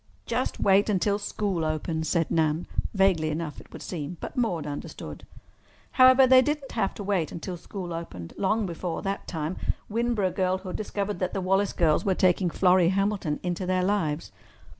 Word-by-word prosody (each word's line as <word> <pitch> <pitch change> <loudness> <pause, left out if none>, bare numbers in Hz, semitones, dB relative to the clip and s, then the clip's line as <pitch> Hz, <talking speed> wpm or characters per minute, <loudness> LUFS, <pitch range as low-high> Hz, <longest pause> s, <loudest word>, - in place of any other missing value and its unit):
"Just 245 +2 -2
wait 200 +2 +4
until 200 +1 +1
school 200 -4 -2
opens," 160 0 -2
said 165 -2 +1
Nan—vaguely 165 +2 +1
enough, 155 -1 -4
it - - -20
would - - -9
seem. 170 -1 -5
But - - -7
Maude 185 - 0
understood. 145 -1 -7 0.6
However, 260 0 +7
they 260 0 +7
did 295 +3 0
not 270 - -11
have 210 -4 -1
to 205 - -6
wait 190 -5 0
until 175 +2 -5
school 175 0 -7
opened. 95 - -7
Long 215 +2 +1
before 170 -1 -4
that 195 0 -3
time 160 +1 -3 0.3
Winboro 230 -4 +1
girlhood 185 0 -1
discovered 205 -1 -3
that 185 -1 -2
the - - 0
Wallace 195 +2 +1
girls 160 -3 +2
were 195 -3 +1
taking 180 0 +3
Florrie 180 0 +4
Hamilton 195 -5 0
into 180 +1 -2
their 185 0 +1
lives. 180 -6 -1
185 Hz, 170 wpm, -27 LUFS, 165-205 Hz, 0.6 s, However